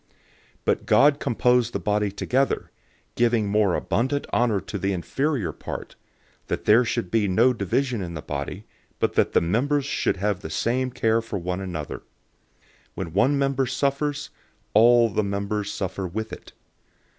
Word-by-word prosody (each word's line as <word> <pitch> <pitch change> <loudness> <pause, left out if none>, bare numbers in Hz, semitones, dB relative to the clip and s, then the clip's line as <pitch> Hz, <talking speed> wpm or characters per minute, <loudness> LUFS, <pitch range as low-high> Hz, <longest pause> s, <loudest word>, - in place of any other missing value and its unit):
But - - 0
God 145 +2 +5
composed 125 -3 +2
the 100 - -1
body 105 +1 0
together, 130 +7 0 0.4
giving 120 -3 +2
more 100 -2 +2
abundant 135 +4 -1
honor 115 -5 +2
to 100 - -6
the 95 +1 0
inferior 120 - -1
part, - - -7 0.5
012:025 - - -39
that - - -3
there 110 +4 +6
should 95 -6 -2
be 110 -3 +2
no 115 +7 +4
division 120 +3 -1
in 85 -2 -5
the 75 - -6
body, 70 -1 -5 0.3
but - - 0
that - - +2
the - - +4
members 135 - +1
should 140 - 0
have 100 0 -1
the 90 - -7
same 125 +10 0
care 115 -2 +1
for 115 -2 -5
one 90 +1 -3
another. 85 -6 -5
012:026 - - -29 0.9
When 85 -4 -5
one 130 +9 +3
member 135 -1 +1
suffers, 140 +3 -1 0.4
all 120 +2 +6
the 110 +1 0
members 100 +1 -2
suffer 95 0 -3
with 110 +5 -5
it. - - -10
110 Hz, 165 wpm, -24 LUFS, 95-130 Hz, 0.9 s, there